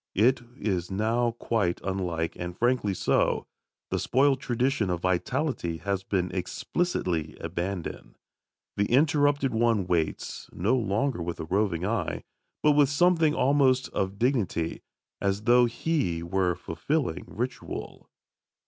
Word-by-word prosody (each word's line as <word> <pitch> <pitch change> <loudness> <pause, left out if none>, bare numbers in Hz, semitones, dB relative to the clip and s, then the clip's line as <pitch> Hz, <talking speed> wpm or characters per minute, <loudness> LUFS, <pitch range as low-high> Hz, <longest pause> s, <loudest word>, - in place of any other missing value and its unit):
It 120 +5 +4 0.2
is 95 -6 -1
now 115 +4 +1
quite 110 -6 0
unlike, 90 -3 -2
and 90 +1 -6
frankly 120 -5 +1
so. - - +1 0.5
The - - 0
spoilt 135 +1 +3
tradition 125 -3 0
of 90 -1 -1
vitality 95 - -1
has 100 +1 -2
been 90 -2 -1
explicitly 90 - -2
abandoned. 85 +2 -4 0.6
The 100 0 +2
interrupted 145 -1 +3
one 115 -3 +2
waits, 85 -3 -2
no 105 +9 +1
longer 115 0 0
with 85 0 -4
a - - -4
roving 95 -1 0
eye, 115 +3 -2 0.4
but 150 - +6
with 145 -2 +4
something 165 +1 +3
almost 130 -1 +3
of 95 +1 -2
dignity, 110 - 0 0.4
as 100 +1 0
though 120 +2 +6
he 115 - -1
were 90 0 +1
fulfilling 90 - -2
ritual. 125 +4 -5
105 Hz, 125 wpm, -27 LUFS, 90-130 Hz, 0.6 s, but